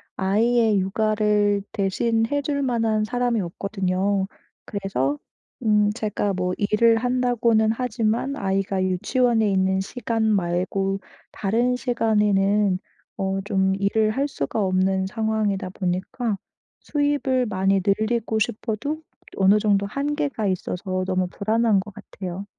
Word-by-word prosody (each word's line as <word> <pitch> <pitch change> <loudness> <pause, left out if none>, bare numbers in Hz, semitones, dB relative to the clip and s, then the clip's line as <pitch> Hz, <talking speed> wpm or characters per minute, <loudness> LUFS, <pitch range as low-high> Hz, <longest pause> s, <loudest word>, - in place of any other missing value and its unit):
아이의 220 +2 +2
육아를 210 +1 +1
대신 225 +3 0
해 285 0 +1
줄 280 -1 -1
만한 225 -4 +1
사람이 245 0 0
없거든요. 195 +1 -1 0.4
그래서 145 -9 -2 0.4
음 210 -2 +3
제가 210 -3 -1
뭐 180 0 -1
일을 225 +3 +3
한다고는 240 -3 +2
하지만 230 +2 -1
아이가 195 -2 -1
유치원에 220 +5 +1
있는 190 0 +2
시간 225 +1 -2
말고 195 -1 0 0.3
다른 235 +5 0
시간에는 210 -5 +2 0.4
어 195 0 -1
좀 190 -1 +1
일을 215 +2 +2
할 275 +5 0
수가 215 - -3
없는 190 0 +1
상황이다 215 -2 -1
보니까 190 +4 -2 0.4
수입을 285 -3 0
많이 195 -1 +1
늘리고 220 +2 +1
싶어도 235 +9 -2 0.3
어느 195 +2 +5
정도 200 -2 +2
한계가 280 -1 -2
있어서 185 0 -2
너무 185 -1 0
불안한 220 +2 +1
것 200 0 -11
같아요. 195 -2 -7
210 Hz, 265 characters per minute, -23 LUFS, 195-230 Hz, 0.4 s, 어느